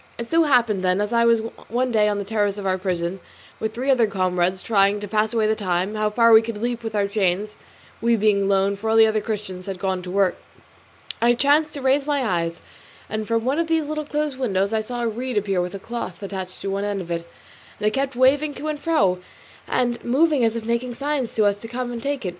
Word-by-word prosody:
It 235 0 -6
so 330 0 +4
happened, 235 -9 +2
then, 185 0 +2
that 205 - +1
as 210 +3 -4
I 235 0 +4
was 230 -1 +4 0.3
one 250 +2 0
day 210 -2 +3
on 205 - -1
the 200 - -2
terrace 205 -1 0
of 200 - -6
our 190 0 0
prison 180 -1 -2 0.4
with 220 0 -3
three 260 +3 +1
other 240 -4 +4
comrades, 185 -1 0
trying, 200 -1 +3
to 205 - -6
pass 215 +1 +1
away 225 -2 +1
the 215 - +3
time, 185 -1 -1
how 215 0 0
far 230 +2 +4
we 220 - +9
could 225 -1 -5
leap 240 +1 -2
with 225 -2 -5
our 200 -1 +1
chains, 200 0 -1 0.5
we 235 0 +3
being 210 -2 +2
alone, 195 0 +2
for 215 +3 -4
all 220 - +2
the 225 0 +8
other 220 -1 +1
Christians 205 -4 -5
had 195 -1 -4
gone 190 0 -1
out - - -10
to - - -6
work, 195 -1 +1 0.8
I 240 +1 +4
chanced 295 +4 +2
to 280 - -6
raise 275 +2 +2
my 285 -3 +1
eyes, 170 -4 -1 0.5
and 215 0 -3
from 230 0 0
one 275 +5 +1
of 335 - 0
these 325 -1 +1
little 305 0 -4
closed 295 -2 -2
windows 200 -4 0
I 220 - +1
saw 240 +2 -4
a - - +1
reed 240 +1 -3
appear 195 -3 +1
with 180 +2 -4
a - - -6
cloth 205 -4 -6
attached 190 -2 -6
to 195 - -3
the - - -1
end 205 0 -2
of 175 -1 -8
it, 170 0 -4 0.5
and - - -3
it 215 - +3
kept 270 +2 -1
waving 280 +4 +3
to 310 - -4
and 300 -1 -3
fro, 200 - +2 0.5
and 240 -1 0
moving 285 +2 +2
as 225 0 +2
if 230 -1 -4
making 235 +1 -1
signs 280 -3 -2
to 215 - +3
us 200 0 +2
to 225 - -9
come 245 +1 -4
and 235 -1 -5
take 280 -3 -3
it. - - 0
220 Hz, 255 wpm, -22 LUFS, 195-245 Hz, 0.8 s, we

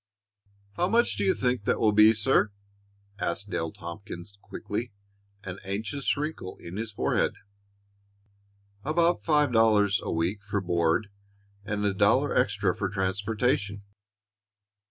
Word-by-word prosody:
"How 180 - +2
much 235 - +3
do 100 - -1
you 95 - +3
think 125 -4 0
that - - +1
will 110 - +4
be, 105 +1 +7
sir?" 110 -1 +2 0.7
asked 100 +4 -2
Dale 80 -1 -2
Tompkins, 85 +2 -9
quickly, 115 +4 -5 0.5
an 95 -1 -6
anxious 105 +9 -2
wrinkle 150 -10 -4
in 85 +2 -9
his 110 0 -4
forehead. 100 - 0 1.5
"About 170 +4 +2
five 150 -4 +3
dollars 105 -3 +4
a - - -4
week 90 +5 -1
for 100 +1 -1
board 85 +1 +1 0.5
and 105 0 -2
a 100 - +2
dollar 115 +9 +3
extra 100 -2 +1
for 100 - -2
transportation." 100 +1 -1
105 Hz, 130 wpm, -27 LUFS, 95-115 Hz, 1.5 s, be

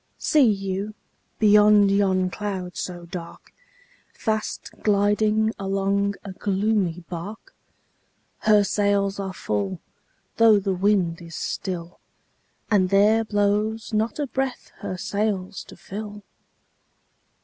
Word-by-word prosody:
See 290 -7 +4
you, 195 +1 -3 0.4
beneath 210 -1 +6
yon 190 -2 +2
cloud 190 -3 -4
so 175 -1 -5
dark, 170 -1 -9 0.6
Fast 215 -1 -3
gliding 210 +1 +2
along 195 +1 0
a 200 - -7
gloomy 190 -3 0
bark? 205 - -8 0.9
Her 210 -1 +4
sails 200 0 +1
are 195 -1 -3
full, 100 - -3 0.6
though 225 -2 +6
the 195 -1 -1
wind 185 -3 +1
is 165 -1 -10
still, 175 -2 -4 0.7
And 190 -3 +3
there 210 +3 +4
blows 210 +1 0
not 220 +2 0
a 295 - -1
breath 265 -1 -3
her 185 - -5
sails 195 0 -2
to - - -13
fill! 210 +1 -8
200 Hz, 110 wpm, -24 LUFS, 185-215 Hz, 0.9 s, beneath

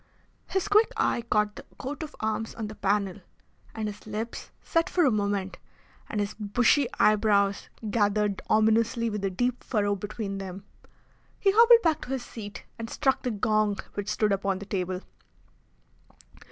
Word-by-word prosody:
His 385 +1 -1
quick 425 +2 +4
eye - - +1
caught 210 0 +2
the - - -9
coat 275 +4 -5
of 305 -1 -7
arms 220 +1 -2
on 225 - -4
the 215 - -7
panel, 200 -2 0 0.6
and 220 -1 -2
his 210 +1 -8
lips 215 +2 -5
set 330 +2 +1
for 350 -3 +3
a 265 - +4
moment 200 -3 -1 0.5
and 210 - -2
his 205 0 -1
bushy 240 +6 +2
eyebrows 205 -2 +3 0.2
gathered 205 -2 +1
ominously 225 +2 +3
with 210 -1 -4
a 195 - +1
deep 245 +6 -1
furrow 205 -3 0
between 205 0 -5
them. 190 0 -7 0.7
He 395 - +4
hobbled 465 +2 +7
back 320 -3 +2
to 265 - -4
his 260 -2 -3
seat 205 -3 -8
and 225 0 -5
struck 270 -3 +1
the 250 - -1
gong 215 -1 +1 0.2
which 205 0 -4
stood 215 -1 +1
upon 195 -1 0
the 200 - -8
table. 185 -2 -2
215 Hz, 165 wpm, -27 LUFS, 200-240 Hz, 0.7 s, hobbled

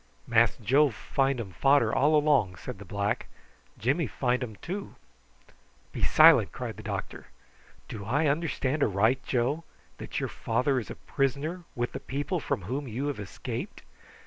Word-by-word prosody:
"Mass 115 0 +3
Joe 135 +7 +4
find 135 +3 -1
um 105 -5 -5
fader 125 - +3
all 150 +3 +4
along," 145 -11 +3
said 90 +3 -8
the 100 - -9
black. 100 +2 -2 0.5
"Jimmy 140 +7 +1
find 125 +3 0
um 110 -4 -6
too." 195 - -6 1.0
"Be - - -6
silent!" - - +6
cried - - -6
the - - -8
doctor. - - -5 0.6
"Do 105 - -7
I 145 +9 +1
understand 150 -1 0
aright, 110 +4 +2
Joe, 130 +6 0 0.4
that - - -4
your - - -1
father 125 +4 0
is 115 - -8
a - - -6
prisoner 150 +6 -2
with 120 0 -2
the - - -5
people 145 +6 -3
from 105 - -2
whom 130 +9 -3
you 130 +6 -2
have 140 - -4
escaped?" 100 -3 -6
130 Hz, 160 wpm, -28 LUFS, 110-145 Hz, 1.0 s, silent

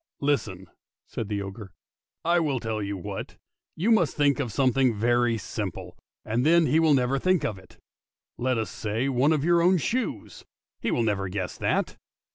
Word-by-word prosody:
" - - -62
Listen! 95 -8 -4 0.2
" - - -67
said 110 -3 -4
the 100 -1 -2
ogre: 95 -1 -9 0.3
" - - -42
I - - +4
will 145 -6 0
tell 110 -2 -3
you 100 -1 -3
what, 85 - -7 0.4
you 205 +8 +1
must 180 -9 +2
think 145 -1 +3
of 125 -5 -2
something 130 -1 +2
very 120 +1 +2
simple, 100 - -6 0.3
and 115 +3 0
then 165 +2 +5
he 155 +4 +3
will 160 -3 +4
never 130 +1 +1
think 185 -2 +2
of 105 -8 -3
it. 95 - -19 0.6
Let 125 0 0
us 110 - -2
say 110 +5 -2
one 135 +3 +2
of 155 -2 +1
your 170 0 +4
own 180 +2 +4
shoes: 195 - -3 0.4
he - - -2
will 120 - +1
never 100 -3 -1
guess 90 -1 -4
that. - - 0
125 Hz, 195 wpm, -26 LUFS, 105-150 Hz, 0.6 s, then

